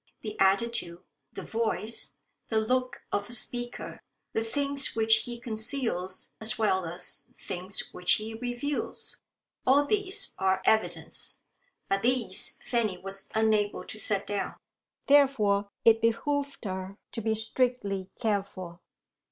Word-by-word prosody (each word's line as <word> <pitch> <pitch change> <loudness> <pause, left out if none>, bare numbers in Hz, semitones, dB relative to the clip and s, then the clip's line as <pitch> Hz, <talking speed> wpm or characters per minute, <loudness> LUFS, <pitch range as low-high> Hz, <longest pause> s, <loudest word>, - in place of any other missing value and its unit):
The 215 -1 -5
attitude, 195 -3 +2 0.3
the - - -7
voice, 225 0 -1 0.3
the 220 - +2
look 255 +3 -1
of 205 +1 -1
a - - -4
speaker, 240 +1 -3 0.3
the 225 - 0
things 280 +3 +2
which 220 0 +6
he 240 -1 -6
conceals 220 -5 -1
as 220 0 +2
well 190 -5 +2
as 175 +2 -3
the - - -32
things 185 +2 0
which 180 0 +3
he 220 +1 -1
reveals 245 +5 -3 0.4
all 280 +3 +5
these 405 +3 +2
are 190 0 +2
evidence. 220 0 +1 0.4
But 195 0 +1
these 240 -5 +2
Fanny 220 -6 0
was 195 +1 -3
unable 215 -2 +2
to 215 - -6
set 200 -2 +2
down. 205 -1 -2 0.5
Therefore 215 -8 +4 0.2
it 225 0 +6
behoved 280 +4 0
her 190 0 -4
to 230 - -4
be 220 0 +1
strictly 220 -4 -1
careful. 195 -6 -2
220 Hz, 130 wpm, -29 LUFS, 195-245 Hz, 0.5 s, which